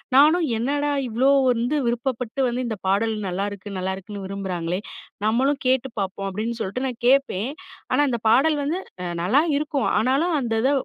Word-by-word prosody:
நானும் 310 Hz, +4 st, +6 dB
என்னடா 285 Hz, +5 st, 0 dB, 0.2 s
இவ்வளோ 240 Hz, +4 st, +2 dB, 0.2 s
வந்து 245 Hz, +5 st, 0 dB
விருப்பப்பட்டு 240 Hz, +1 st, -2 dB
வந்து 250 Hz, +1 st, -2 dB
இந்த 220 Hz, -, -3 dB
பாடல் 215 Hz, +3 st, +2 dB
நல்லாருக்கு 200 Hz, +1 st, -4 dB
நல்லாருக்குன்னு 190 Hz, +2 st, -5 dB
விரும்புறாங்களே 185 Hz, -3 st, -3 dB, 0.5 s
நம்மளும் 270 Hz, +6 st, +1 dB
கேட்டு 260 Hz, 0 st, +2 dB
பார்ப்போம், 195 Hz, 0 st, -3 dB
அப்படின்னு 225 Hz, +4 st, -3 dB
சொல்ட்டு 250 Hz, +8 st, -2 dB
நான் 245 Hz, -3 st, -6 dB
கேட்பேன். 260 Hz, -4 st, +2 dB, 0.4 s
ஆனா -, -, +3 dB
அந்த 235 Hz, -2 st, -1 dB
பாடல் 295 Hz, +7 st, +4 dB
வந்து 320 Hz, +6 st, -1 dB, 0.4 s
நல்லா 255 Hz, -, +4 dB
இருக்கும். 295 Hz, -2 st, -1 dB
ஆனாலும் 275 Hz, +9 st, +2 dB
அந்த 230 Hz, -3 st, -2 dB
இத 270 Hz, -, +3 dB
235 Hz, 150 wpm, -23 LUFS, 200-275 Hz, 0.5 s, நானும்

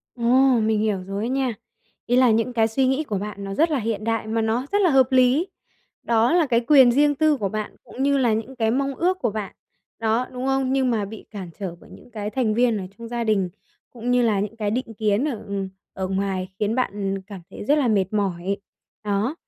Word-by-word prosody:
Ồ, 235 Hz, -, -9 dB, 0.4 s
mình 215 Hz, -1 st, +1 dB
hiểu 205 Hz, -4 st, 0 dB
rồi 200 Hz, +2 st, -4 dB
á -, -, -2 dB
nha. 260 Hz, -3 st, 0 dB, 0.5 s
Ý 245 Hz, -, +2 dB
là 255 Hz, -2 st, +5 dB
những 230 Hz, +3 st, +1 dB
cái 225 Hz, -1 st, +2 dB
suy 260 Hz, +4 st, +1 dB
nghĩ 265 Hz, +4 st, +1 dB
của 205 Hz, -7 st, -2 dB
bạn 200 Hz, 0 st, -6 dB
nó 195 Hz, 0 st, -5 dB
rất 320 Hz, +6 st, +2 dB
là 290 Hz, -, +1 dB
hiện 220 Hz, -2 st, -2 dB
đại 225 Hz, -1 st, -1 dB
mà 225 Hz, +1 st, -1 dB
nó 225 Hz, +4 st, 0 dB
rất 410 Hz, -, +3 dB
là 355 Hz, -, +4 dB
hợp 265 Hz, -1 st, +4 dB
lý. 260 Hz, +7 st, +4 dB, 0.6 s
Đó 230 Hz, +2 st, +2 dB
là 340 Hz, -3 st, +4 dB
cái 235 Hz, -2 st, +2 dB
quyền 265 Hz, -5 st, +7 dB
riêng 290 Hz, +2 st, +3 dB
tư 310 Hz, 0 st, +3 dB
của 200 Hz, -5 st, -2 dB
bạn 215 Hz, +1 st, -5 dB
cũng 265 Hz, -, -6 dB
như 280 Hz, 0 st, +3 dB
là 240 Hz, -4 st, +3 dB
những 225 Hz, +4 st, -3 dB
cái 225 Hz, -1 st, +1 dB
mong 275 Hz, +2 st, 0 dB
ước 365 Hz, +4 st, 0 dB
của 235 Hz, -, 0 dB
bạn, 205 Hz, -2 st, -5 dB, 0.4 s
đó, 225 Hz, +3 st, +1 dB
đúng 255 Hz, +1 st, -4 dB
không? 270 Hz, -1 st, +1 dB
Nhưng 265 Hz, -2 st, +2 dB
mà 215 Hz, -3 st, 0 dB
bị 215 Hz, +2 st, -9 dB
cản 190 Hz, -5 st, -7 dB
trở 180 Hz, -4 st, -5 dB
bởi -, -, -17 dB
những -, -, -15 dB
cái 210 Hz, -1 st, -4 dB
thành 230 Hz, -4 st, 0 dB
viên 235 Hz, -2 st, +2 dB
ở 190 Hz, -, -5 dB
trong 230 Hz, 0 st, -8 dB
gia 235 Hz, -1 st, -2 dB
đình 200 Hz, -4 st, +1 dB, 0.4 s
cũng 240 Hz, 0 st, -4 dB
như 250 Hz, 0 st, +3 dB
là 210 Hz, -4 st, +2 dB
những 210 Hz, +2 st, -4 dB
cái 210 Hz, -2 st, -1 dB
định 230 Hz, -1 st, -3 dB
kiến 215 Hz, +6 st, +1 dB
ở, 230 Hz, -7 st, -5 dB
ừm, 195 Hz, -1 st, -3 dB, 0.2 s
ở 190 Hz, -1 st, -4 dB
ngoài 190 Hz, -1 st, -2 dB
khiến 215 Hz, +2 st, 0 dB
bạn 195 Hz, -5 st, -2 dB
cảm 200 Hz, -3 st, -9 dB
thấy -, -, -8 dB
rất 295 Hz, +5 st, +3 dB
là 260 Hz, -5 st, +2 dB
mệt 195 Hz, -4 st, +2 dB
mỏi. 195 Hz, -2 st, -1 dB, 0.5 s
Đó, 210 Hz, +8 st, 0 dB
225 Hz, 245 wpm, -23 LUFS, 205-255 Hz, 0.6 s, quyền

